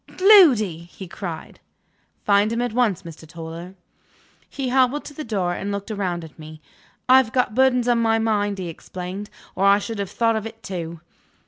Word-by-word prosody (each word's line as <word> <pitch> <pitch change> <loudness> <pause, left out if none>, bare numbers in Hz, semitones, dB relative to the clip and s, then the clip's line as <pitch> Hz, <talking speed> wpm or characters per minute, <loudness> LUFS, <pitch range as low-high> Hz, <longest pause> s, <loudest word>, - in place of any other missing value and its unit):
"Gloody!" 265 - +5
he 190 - -10
cried. 170 -2 -8 0.7
"Find 205 +1 +3
him 230 - -1
at 245 -3 -3
once, 230 -7 +1
Mr. 165 -1 -11
Toller." 165 +3 -9 0.7
He 265 -2 -4
hobbled 260 +3 +2
to 290 - -9
the 305 - -6
door 195 -8 -1
and 200 +3 -4
looked 200 +2 -5
round 185 -5 -3
at 160 0 -13
me. 155 0 -11 0.5
"I've 255 -3 +5
got 250 -3 0
burdens 250 0 +3
on 240 -1 +3
my 225 -1 +2
mind," 205 -2 0
he 185 -2 -5
explained, 185 +4 -7 0.2
"or 190 - -2
I 200 0 +6
should 215 +1 -5
have 200 -2 -3
thought 230 -1 +1
of 220 0 -3
it 225 0 -13
too." 170 -3 -6
205 Hz, 185 wpm, -22 LUFS, 180-240 Hz, 0.7 s, I